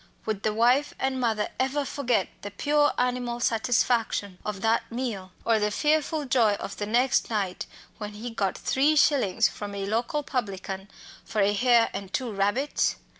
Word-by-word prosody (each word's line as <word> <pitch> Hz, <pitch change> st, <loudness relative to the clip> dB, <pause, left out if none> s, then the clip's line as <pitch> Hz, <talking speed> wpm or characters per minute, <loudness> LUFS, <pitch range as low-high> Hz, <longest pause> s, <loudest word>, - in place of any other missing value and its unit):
Would 215 Hz, -3 st, -2 dB
the 215 Hz, -, +1 dB
wife 245 Hz, +6 st, +2 dB
and 265 Hz, 0 st, -1 dB
mother 225 Hz, -4 st, 0 dB
ever 270 Hz, +2 st, 0 dB
forget 250 Hz, -7 st, 0 dB
the 205 Hz, -, -5 dB
pure 290 Hz, +8 st, +2 dB
animal 245 Hz, -1 st, -1 dB
satisfaction 225 Hz, -4 st, +1 dB
of 205 Hz, -2 st, -4 dB
that 225 Hz, +1 st, +1 dB
meal, 225 Hz, -7 st, -4 dB
or 225 Hz, -1 st, +3 dB
the 210 Hz, 0 st, +1 dB
fearful 300 Hz, +5 st, +1 dB
joy 235 Hz, -5 st, +3 dB
of 200 Hz, -, -7 dB
the 205 Hz, -, -3 dB
next 245 Hz, +4 st, +2 dB
night, 200 Hz, -5 st, -2 dB, 0.3 s
when 210 Hz, 0 st, -5 dB
he 230 Hz, +3 st, -6 dB
got 200 Hz, -4 st, -1 dB
three 290 Hz, +4 st, +2 dB
shillings 275 Hz, -10 st, +3 dB
from 205 Hz, -1 st, -7 dB
a 195 Hz, -1 st, -3 dB
local 235 Hz, +8 st, -1 dB
publican 195 Hz, -6 st, -4 dB, 0.3 s
for 215 Hz, -, -4 dB
a 200 Hz, +1 st, +3 dB
hare 235 Hz, +1 st, +4 dB
and 195 Hz, -1 st, -6 dB
two 250 Hz, -3 st, -1 dB
rabbits? 205 Hz, +9 st, +1 dB
230 Hz, 170 wpm, -26 LUFS, 205-260 Hz, 0.3 s, hare